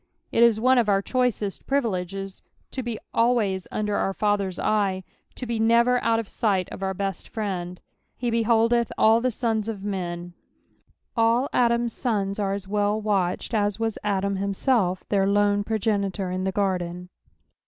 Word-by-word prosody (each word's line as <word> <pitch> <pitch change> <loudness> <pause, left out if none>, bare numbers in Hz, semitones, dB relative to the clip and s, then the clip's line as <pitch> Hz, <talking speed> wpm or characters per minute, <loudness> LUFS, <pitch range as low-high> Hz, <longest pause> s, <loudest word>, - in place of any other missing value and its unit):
Qt^ia 230 -2 +5
one 255 +3 +4
of 225 -3 +1
our 195 0 +2
choicest 245 -6 -1
privileges 195 -7 -2 0.3
to 260 - -3
be 235 -3 -4 0.2
alwajH 225 -6 +1
under 210 -1 -1
our 195 - -1
Father's 200 -3 0
eye, 195 -3 0 0.3
to 255 - -6
be 235 -2 -2
never 235 +2 +3
out 230 0 +3
of 225 -2 -3
sight 195 -5 0
of - - -8
our 190 0 -2
best 195 -2 -4
Friend.^ 180 -5 -4 0.2
" - - -46
H» 235 - +1
behMiUth 230 0 +3
tdl 240 0 +3
ikt 230 +1 +2
tout 220 -2 +1
of 210 -4 -5
men.'' 175 -3 -4 0.8
AH 230 +3 +3
Adam's 235 -1 +2
sons 205 -5 -1
are 195 -1 0
as 200 -1 -5
well 205 +1 +1
watched^ 205 +1 0
was 225 -1 -2
Adam 200 -1 0
himself, 195 -1 0
their 195 -2 +2
lone 205 0 +2
progenitor 200 -3 -1
in 185 +1 -2
the 190 - 0
ffordcn. 180 -2 -2
205 Hz, 160 wpm, -25 LUFS, 195-230 Hz, 0.8 s, Qt^ia